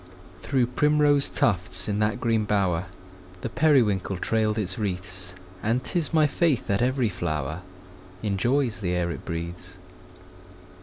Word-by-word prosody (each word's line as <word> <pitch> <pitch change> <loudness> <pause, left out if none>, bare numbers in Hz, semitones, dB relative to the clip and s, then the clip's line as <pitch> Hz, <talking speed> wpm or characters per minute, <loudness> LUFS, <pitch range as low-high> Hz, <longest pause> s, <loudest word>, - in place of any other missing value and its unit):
Through 130 -3 +1
primrose 145 +2 +3
tufts, 90 -5 +1
in 105 -1 -1
that 110 +3 +1
green 115 -2 +1
bower, 95 -4 +1 0.6
The - - -3
periwinkle 115 - +2
trailed 110 +2 0
its 95 -2 -1
wreaths; 90 -2 -3 0.3
And 115 +4 0
'tis 170 -4 -1
my 160 -2 +4
faith 150 -3 +1
that 100 +2 0
every 130 0 +2
flower 80 -3 -3 0.6
Enjoys 115 +5 +1
the 90 -3 -1
air 85 -1 0
it - - -7
breathes. 85 +2 -5
105 Hz, 135 wpm, -25 LUFS, 90-130 Hz, 0.6 s, my